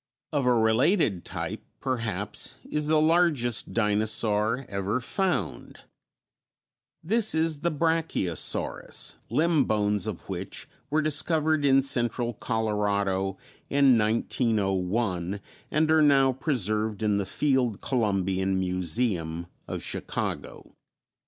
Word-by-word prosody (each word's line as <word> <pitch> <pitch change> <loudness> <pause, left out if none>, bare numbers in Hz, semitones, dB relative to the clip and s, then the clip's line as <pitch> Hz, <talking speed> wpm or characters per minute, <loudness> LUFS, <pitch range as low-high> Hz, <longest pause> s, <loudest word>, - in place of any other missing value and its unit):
Of 140 -4 +1
a 125 - +5
related 115 - +2
type, - - -5 0.2
perhaps, 115 -5 -2
is 150 0 -1
the 155 0 +4
largest 155 -7 +2
dinosaur 110 +2 +1
ever 100 +4 -2
found; 125 - -2 1.2
this 220 +2 +2
is 160 -2 +1
the 170 +3 0
Brachiosaurus, 160 - -1 0.2
limb 155 +4 +2
bones 105 0 0
of 105 -5 -6
which 95 -1 -6 0.2
were 155 +1 +1
discovered 155 0 +2
in 135 -1 +4
central 120 -2 0
Colorado 100 -4 -1 0.3
in 140 -2 +5
1901 100 -4 0 0.3
and 155 +1 +2
are 160 0 +5
now 135 -3 +5
preserved 110 - -1
in 105 -1 +2
the 100 - -2
Field 130 -7 +1
Columbian 95 -5 0
Museum 90 -2 -1 0.2
of - - -5
Chicago. - - -4
115 Hz, 105 wpm, -27 LUFS, 100-145 Hz, 1.2 s, a